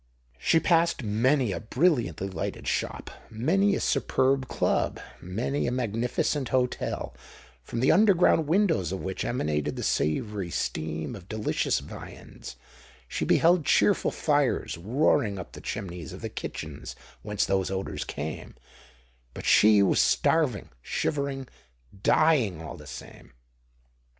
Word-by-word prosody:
She 165 - +3
passed 170 -4 +2
many 120 +3 +2
a 85 - -3
brilliantly 120 - +1
lighted 95 -4 -5
shop,—many 190 - -1
a - - -1
superb 130 0 +1
Club,—many 115 +9 -2
a - - 0
magnificent 125 +3 -1
hotel, 125 - -1 0.5
from 115 - -4
the 130 - +5
underground 180 -5 +4
windows 165 - +2
of 95 - -4
which 95 0 -4
emanated 75 - -1
the - - -5
savoury 95 - -1
steam 80 +4 -3
of 95 -3 -13
delicious 110 -1 0
viands:—she - - -9
beheld 170 0 +4
cheerful - - +3
fires, - - 0
roaring 110 - +1
up 90 - -8
the - - -11
chimneys 90 -7 -6
of - - -9
the - - -4
kitchens - - -7 0.3
whence 105 -1 -1
those 95 -1 0
odours 95 0 -3
came;—but 60 -5 -10
she 105 -1 +6
was 95 - +2
starving, 150 -11 +2
shivering, 140 - -2 0.5
dying, 125 - +3
all 80 -5 -7
the 75 - -13
same! 65 -1 -11
110 Hz, 120 wpm, -27 LUFS, 85-140 Hz, 0.5 s, she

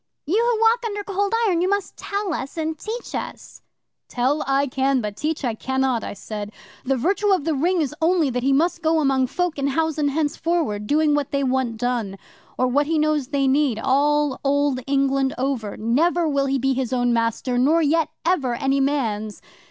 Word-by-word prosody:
"You 400 +10 +2
who - - -3
walk 455 +2 +4
under 415 -2 -3
Cold 405 +2 -1
Iron, 355 -5 +1
you 365 - +1
must 400 -1 -1
tell 400 -3 -3
us 275 +1 -5
and 320 0 -2
teach 445 +9 -6
us." - - -7 0.5
'"Tell 260 +5 0
I 275 +1 +2
can, 270 0 +1
but 210 -3 -4
teach 300 +3 -2
I 235 - 0
cannot," 265 0 -1
I - - -5
said. 210 +1 -7 0.3
"The 270 +1 0
virtue 395 - +1
of 370 -6 +2
the 320 +1 0
Ring 340 +5 +1
is 295 -2 -2
only 325 -4 +2
that 250 0 -2
he 270 +2 +1
must 330 +5 +1
go 320 0 +2
among 270 -3 +2
folk 350 +2 -2
in 275 - 0
housen 310 +1 0
henceforward, 290 -6 -1
doing 300 +2 +3
what 290 -2 0
they 280 0 -1
want 255 -3 0
done, 230 -5 -2 0.4
or 255 - +2
what 285 +3 +1
he 325 0 +1
knows 305 -3 +1
they 275 -1 0
need, 270 -3 +2
all 290 +3 +1
Old 285 -1 +1
England 275 -1 +1
over. 250 -6 -2
Never 320 +10 +1
will 280 -2 +1
he 270 0 +1
be 270 +1 +1
his 260 -2 -2
own 245 -1 +1
master, 230 +2 0
nor 315 +6 +3
yet 310 +1 +2 0.2
ever 280 -9 +1
any 270 +3 0
man's. 225 -7 -1
280 Hz, 200 wpm, -22 LUFS, 255-320 Hz, 0.5 s, walk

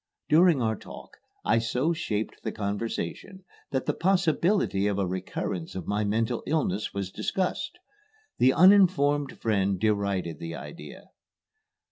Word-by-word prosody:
During 160 -4 +5
our 110 -1 +1
talk, - - -11 0.3
I 115 +2 +3
so 125 +8 0
shaped 110 -10 -3
the - - -3
conversation 105 - -4 0.3
that 130 - -2
the - - 0
possibility 180 - +1
of 100 -1 0
a 100 - +1
recurrence 90 -2 -4
of 95 -3 -5
my 105 +1 0
mental 115 +3 0
illness 110 - 0
was 100 -2 -4
discussed. 190 - -2 0.6
The 130 +2 +6
uninformed 160 -6 +4
friend 100 -4 +1
derided 100 -6 0
the 85 0 -6
idea. 75 +2 -10
110 Hz, 130 wpm, -27 LUFS, 100-160 Hz, 0.6 s, The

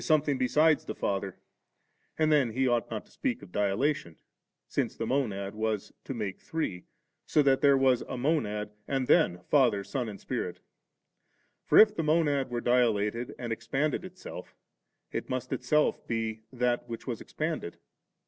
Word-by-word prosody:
thing 150 -4 +2
berides 150 +4 +3
the 110 - -4
Father, 100 -1 -2 0.8
and 155 -1 +3
then 135 -7 +3
he 130 +2 +1
ought 120 -2 +1
not - - -5
to - - -25
^eak - - -1
of - - -13
dilatation, 100 - 0 0.5
since - - -1
the - - -3
Monad 100 -8 -1
was 110 -1 -2
to 135 - -5
make 105 -5 -4
Three, 100 - -3 0.4
so 150 - +4
that 135 -1 +3
there 140 -1 +6
was 130 -2 +3
a - - -3
Monad, 110 -7 0 0.2
and 135 -2 0
then 90 -6 +3
Father, 120 -9 +3
Son, 125 +1 -3
and 100 -2 -8
Spirit - - -4 1.1
For - - +5
if 215 -1 +8
the 190 - -2
Monad 150 -3 +2
were 120 -1 -2
dilated, 120 -2 +1
and 120 -2 -3
expanded 135 +9 -1
itself 185 0 -9 0.6
it - - -4
must 130 0 -3
itself 150 +4 +1
be 115 -1 -2
that 120 -1 0
which 115 - -6
was 120 -4 -4
expanded. 155 - -4
125 Hz, 160 wpm, -29 LUFS, 110-145 Hz, 1.1 s, if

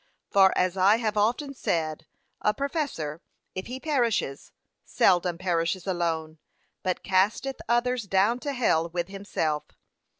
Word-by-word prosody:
For 195 -1 +6
as 185 +1 +1
I 195 +3 +5
have 225 -2 -1
often 240 +7 +1
said, 160 - -2 0.3
a 210 - +2
professor, 275 - -3 0.3
if 185 - -5
he 255 +2 -5
perishes, 240 - -1 0.3
seldom 175 -2 +2
perishes 175 0 -1
alone, 165 -4 -2 0.4
but 185 -2 -2
casteth 205 +8 +1
others 240 -1 +1
down 200 +5 +2
to 285 +2 -3
hell 170 -10 +2
with 175 +1 -3
himself. 180 -6 -2
190 Hz, 130 wpm, -27 LUFS, 170-240 Hz, 0.4 s, For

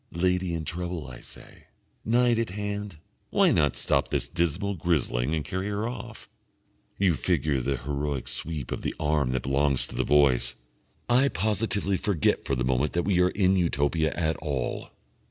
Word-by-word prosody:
"Lady 90 0 0
in 80 -1 -4
trouble," 85 -1 -4
I 65 -2 -9
say. - - -13 0.4
"Knight 120 0 +3
at 115 - -1
hand. 105 -1 -4 0.3
Why - - +4
not 75 - +2
stop - - +1
this - - -1
dismal 85 +5 -1
grizzling 75 -5 0
and 75 - -3
carry 95 +1 -3
her 105 +2 -2
off?" 125 - -8 0.7
(You 95 -3 +3
figure 75 -1 0
the 70 +2 -1
heroic 70 +1 -3
sweep 75 -6 0
of - - -3
the - - -3
arm 75 -3 +1
that 65 -1 -1
belongs 70 0 +2
to - - -8
the - - +1
Voice.) 70 -4 +3 0.5
I 125 +3 +4
positively 105 -3 0
forget 90 -4 0
for 70 - 0
the 65 0 -1
moment 65 +3 +1
that 85 - +1
we 95 -3 +3
are 90 - +4
in 95 -1 +2
Utopia 80 -2 +1
at 80 -2 -1
all. 70 -5 -3
80 Hz, 170 wpm, -27 LUFS, 70-95 Hz, 0.7 s, Why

